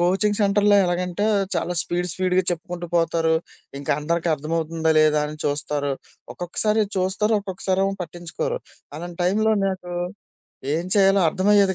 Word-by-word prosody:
Coaching 195 +4 +2
సెంటర్‌లో 205 0 +4
ఎలాగంటే 180 +3 -1 0.3
చాలా 175 +1 -1
స్పీడ్ 175 +1 -2
స్పీడ్‌గా 185 0 +1
చెప్పుకుంటూ 175 0 -4
పోతారు, 165 -1 +2 0.4
ఇంకా 140 - -4
అందరికి 170 +2 -1
అర్థమవుతుందా 160 +2 -1
లేదా 155 -1 +4
అని 155 +1 -7
చూస్తారు. 145 0 -1 0.4
ఒక్కొక్కసారి 210 +5 0 0.2
చూస్తారు, 190 +4 +1
ఒక్కొక్కసారి 190 -1 -2
ఏమో 195 0 0
పట్టించుకోరు. 170 0 -4 0.4
అలాంటి 175 +1 -7
టైంలో 215 +5 +2
నాకు 185 -2 -4 0.8
ఏం 170 +3 -2
చేయాలో 195 -1 +5
అర్థమయ్యేది 195 +2 +3
180 Hz, 130 wpm, -23 LUFS, 165-195 Hz, 0.8 s, చేయాలో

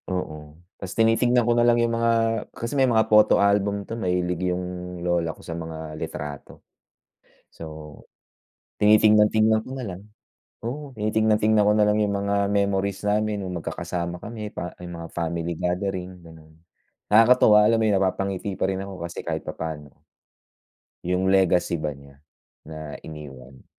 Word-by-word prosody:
Oo, 75 -4 -5 0.2
'tas 95 -1 -7
tinitingnan 115 +2 +3
ko 120 - +3
na 120 - +2
lang 120 0 +4
yung 115 0 +1
mga 115 0 +2 0.5
kasi 115 +2 -4
may 135 -2 +3
mga 110 -2 +3
photo 105 -1 +5
album 100 0 +1
'to, - - -7
mahilig 90 -1 -1
yung 90 0 -2 0.4
lola 85 -2 +1
ko - - -16
sa 85 - -5
mga 80 -1 -7
litrato. 75 -1 -7 0.8
So, - - -11 1.2
tinitingnan-tingnan 110 +1 +5
ko - - -9
na 130 - -5
lang. 95 -2 -7 0.7
Oo, 145 +4 -5
tinitingnan-tingnan 110 0 +2
ko 105 +1 +4
na 105 - +4
lang 105 0 +2
yung 100 -1 0
mga 100 0 0
memories 100 0 0
namin, 105 -1 0
yung 90 - -5
magkakasama 85 +1 -4
kami 105 +1 -7
pa 90 -4 -6
yung 85 0 -7
mga 85 0 -7
family 85 0 -2
gathering, 90 +2 -2 0.2
ganon. 80 -1 -16 0.5
Nakakatuwa, 110 -1 +6
alam 115 +2 +3
mo 110 - +1
’yon, 105 - +2
napapangiti 95 0 -2
pa - - +1
rin 95 0 -2
ako 95 -1 -8
kasi 85 - -7
kahit 80 -1 -4
papano. 75 -3 -6 1.1
Yung 90 +2 +1
legacy 90 -2 +2
ba 75 - -1
niya, 70 0 -17 0.4
na 80 -1 -8
iniwan. 70 -4 -11
95 Hz, 155 wpm, -24 LUFS, 85-110 Hz, 1.2 s, Nakakatuwa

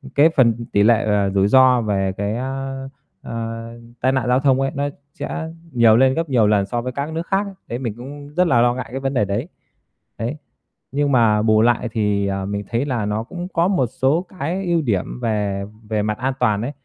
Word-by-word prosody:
cái 150 +3 +6
phần 115 -6 +2
tỷ 100 - +4
lệ, 115 +1 +4
ờ, 100 -2 +2
rủi 95 0 +2
ro 130 +1 +5
về 95 -3 0
cái, 100 +2 -2
a, 135 +1 -4 0.5
ơ, 115 0 -5 0.3
tai 130 - +3
nạn 130 -2 0
giao 125 +1 +3
thông 135 -1 +3
ấy, 135 - 0
nó 145 0 -1 0.2
sẽ 160 +1 -5 0.2
nhiều 115 -3 +5
lên 130 +1 +4
gấp 165 0 -2
nhiều 115 -5 +3
lần 105 -2 +3
so 120 +4 -2
với 125 +1 -4
các 140 +4 -4
nước 165 +2 -4
khác 195 +1 +1
ấy, 200 - -8
đấy 120 - -4
mình 115 -5 -3
cũng 145 +3 -9
rất 180 0 +3
là 120 -7 +4
lo 120 0 +3
ngại 130 - -5
cái 135 - -3
vấn 135 0 -2
đề 105 - +2
đấy. 100 - -2 0.7
Đấy, 120 +7 -3 0.5
nhưng 145 +1 0
mà 115 -4 +4
bù 110 0 +4
lại 120 +1 +2
thì, 105 -2 0
ờ, 95 0 -2
mình 100 +1 -3
thấy 120 +4 0
là 120 -7 -1
nó 105 +2 -1
cũng 175 +7 -7
có 170 +2 +2
một 180 -10 +2
số 135 +8 0
cái 180 +7 -2
ưu 170 -2 +2
điểm 110 -3 -2
về 105 -4 -1 0.3
về 110 -1 0
mặt 105 0 -1
an 130 +1 -1
toàn 105 -4 +2
ấy. 135 - -3
120 Hz, 230 wpm, -20 LUFS, 105-140 Hz, 0.7 s, cái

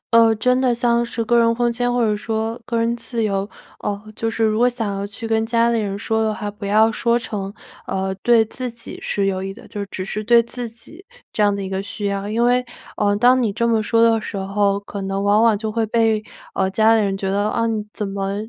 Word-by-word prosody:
呃， 230 -1 +6
真 250 +4 +2
的 255 -2 +3
像 235 0 +2
是 235 -1 -3
个 235 +1 +3
人 230 0 +4
空 240 -1 +1
间 245 +1 0
或 245 - +1
者 215 -2 +2
说 225 +2 -3
个 235 -1 -2
人 230 +1 +1
自 235 -1 -3
由 200 -1 -1 0.3
呃， 200 -1 -3
就 225 +1 -2
是 225 0 0
如 215 0 +2
果 245 +1 +5
想 225 -5 -3
要 195 - -3
去 205 +3 -7
跟 225 0 +1
家 230 +1 +2
里 230 -1 +1
人 200 -1 -3
说 220 +1 0
的 220 -1 +1
话， 210 -1 -5
不 205 0 -7
要 215 +2 +4
说 235 +2 +2
成， 200 -5 -5 0.4
呃， 190 0 -1
对 235 -2 +5
自 250 +3 -5
己 235 0 -10
是 200 -1 0
有 190 -1 -1
益 195 0 -4
的， 235 +5 -14
就 205 -1 -5
只 190 -1 -5
是 210 +2 -4
对 235 +2 +5
自 235 +1 -5
己 240 - -13 0.3
这 215 - 0
样 205 -1 +3
的 200 - -4
一 - - -4
个 190 0 -2
需 205 +1 -5
要。 200 0 -2
因 230 +3 +1
为 250 +1 +3 0.3
呃， 205 -1 +2
当 250 +4 +4
你 220 -4 0
这 235 +3 0
么 225 -2 +2
说 230 +2 +2
的 225 -1 +4
时 205 - -6
候， 200 +1 +1
可 200 0 -7
能 195 0 -2
往 205 +2 +4
往 225 -3 +4
就 220 0 -3
会 225 0 0
被， 220 -1 +2 0.3
呃， 190 -1 +1
家 220 +3 +4
里 220 - +3
人 195 -1 0
觉 195 - -2
得： 200 +2 +1
“啊， 230 - 0
你 220 -2 -1
怎 210 - -4
么 195 0 -3
220 Hz, 275 characters per minute, -20 LUFS, 200-235 Hz, 0.4 s, 呃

